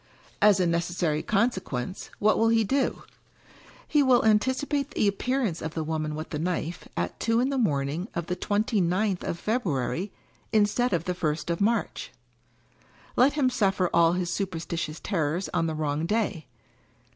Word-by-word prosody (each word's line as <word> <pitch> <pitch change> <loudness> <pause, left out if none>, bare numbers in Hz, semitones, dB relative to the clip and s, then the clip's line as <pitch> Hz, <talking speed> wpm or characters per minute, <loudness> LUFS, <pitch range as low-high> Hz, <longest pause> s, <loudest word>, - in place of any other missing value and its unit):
As 205 -2 +6
a 180 - +3
necessary 170 -2 0
consequence 190 - -1
— - - -19
what 215 +1 +3
will 225 - +4
he 225 -1 +4
do? 270 +7 0 0.8
He 295 - +3
will 255 -4 +4
anticipate 260 +6 +1
the 215 - +1
appearance 220 -2 -1
of 160 0 -5
the 160 - -1
Woman 155 -1 -2
with 155 +1 -6
the 150 - -3
Knife, 170 -1 -3
at 85 0 -2
two 230 0 +2
in 255 +2 +2
the 275 - -1
morning 150 - 0
of 170 -2 -2
the 180 - -2
twenty 205 +2 0
ninth 185 +2 0
of 170 - -3
February, 185 - -1 0.4
instead 220 +3 +2
of 170 -4 0
the 180 - -1
first 160 -1 -2
of 170 - -2
March. 230 +3 0 1.0
Let 265 +3 +5
him 275 -4 +2
suffer 195 -5 +1
all 170 0 +5
his 180 -1 -1
superstitious 170 -4 -3
terrors 170 -1 -1
on 165 -2 +1
the 160 - -2
wrong 155 +1 -1
day. 210 -6 -1
185 Hz, 170 wpm, -27 LUFS, 165-220 Hz, 1.0 s, As